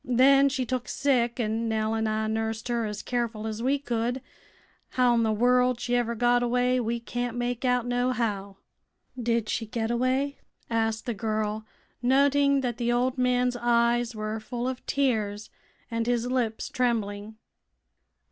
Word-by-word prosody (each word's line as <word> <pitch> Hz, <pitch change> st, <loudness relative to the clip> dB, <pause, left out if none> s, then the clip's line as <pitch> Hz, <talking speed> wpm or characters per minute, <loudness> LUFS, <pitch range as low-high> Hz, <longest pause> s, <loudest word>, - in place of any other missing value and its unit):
Then 275 Hz, +3 st, +5 dB
she 260 Hz, -2 st, -2 dB
took 255 Hz, 0 st, -3 dB
sick, 245 Hz, -4 st, +1 dB
an' 225 Hz, 0 st, -1 dB
Nell 220 Hz, 0 st, 0 dB
an' 220 Hz, 0 st, 0 dB
I 215 Hz, 0 st, 0 dB
nursed 220 Hz, +1 st, -2 dB
her 235 Hz, -2 st, 0 dB
as 210 Hz, -1 st, -5 dB
careful 235 Hz, -3 st, -2 dB
as 220 Hz, 0 st, -4 dB
we 270 Hz, +4 st, +2 dB
could. 245 Hz, -2 st, -2 dB, 0.8 s
How'n 240 Hz, -2 st, +4 dB
the 220 Hz, -1 st, +2 dB
wurld 250 Hz, +2 st, +3 dB
she 245 Hz, 0 st, -1 dB
ever 235 Hz, -1 st, 0 dB
got 245 Hz, +1 st, +3 dB
away 250 Hz, +1 st, +2 dB
we 235 Hz, 0 st, -1 dB
can't 245 Hz, 0 st, -4 dB
make 245 Hz, 0 st, -2 dB
out, 250 Hz, -2 st, +2 dB
nohow." 235 Hz, -6 st, -1 dB, 0.6 s
"Did 230 Hz, -2 st, 0 dB
she 225 Hz, 0 st, -2 dB
get 225 Hz, +1 st, -2 dB
away?" 260 Hz, +4 st, 0 dB, 0.3 s
asked 225 Hz, -1 st, 0 dB
the 240 Hz, -, -1 dB
girl, 215 Hz, 0 st, -2 dB, 0.3 s
noting 280 Hz, +2 st, +3 dB
that 240 Hz, -3 st, -2 dB
the 240 Hz, -1 st, 0 dB
old 250 Hz, +2 st, 0 dB
man's 250 Hz, 0 st, +2 dB
eyes 240 Hz, 0 st, +2 dB
were 215 Hz, +1 st, -3 dB
full 240 Hz, +3 st, -4 dB
of 260 Hz, -1 st, -4 dB
tears 215 Hz, -6 st, 0 dB, 0.4 s
and 230 Hz, 0 st, -1 dB
his 240 Hz, -1 st, +1 dB
lips 235 Hz, -4 st, -1 dB
trembling. 220 Hz, -4 st, -1 dB
240 Hz, 155 wpm, -27 LUFS, 220-250 Hz, 0.8 s, Then